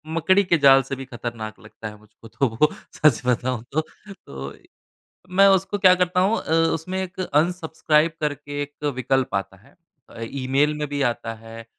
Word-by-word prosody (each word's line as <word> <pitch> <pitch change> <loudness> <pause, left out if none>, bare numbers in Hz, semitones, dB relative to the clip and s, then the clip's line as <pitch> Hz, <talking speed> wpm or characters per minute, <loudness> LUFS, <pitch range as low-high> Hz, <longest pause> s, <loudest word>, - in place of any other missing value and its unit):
मकड़ी 190 +5 +3
के 175 -2 +2
जाल 135 -2 +7
से 135 +1 -5
भी 135 0 -8
खतरनाक 120 -4 -7
लगता 110 0 -10
है 105 - -9
मुझको 110 +2 -18
तो 135 +5 0
वो, 115 +7 +2 0.2
सच 150 -7 +3
बताऊँ 125 -1 0
तो। 155 - +2 0.3
तो 70 - -9
इ - - -24 0.6
मैं 190 +2 +5
उसको 195 +1 +2
क्या 185 -2 +6
करता 180 0 +1
हूँ 200 +5 +2
अ, - - -5 0.2
उसमें 165 +4 -4
एक 185 0 -7
अनसब्सक्राइब 160 -2 +1
करके 145 -1 -3
एक 145 +1 -8
विकल्प 130 -2 0
आता 95 0 -3
है 100 - -23 0.3
अ, 115 - -12
ईमेल 135 +5 0
में 150 -1 -3
भी 145 0 -3
आता 115 -1 -5
है 115 0 -10
145 Hz, 185 wpm, -23 LUFS, 115-170 Hz, 0.6 s, जाल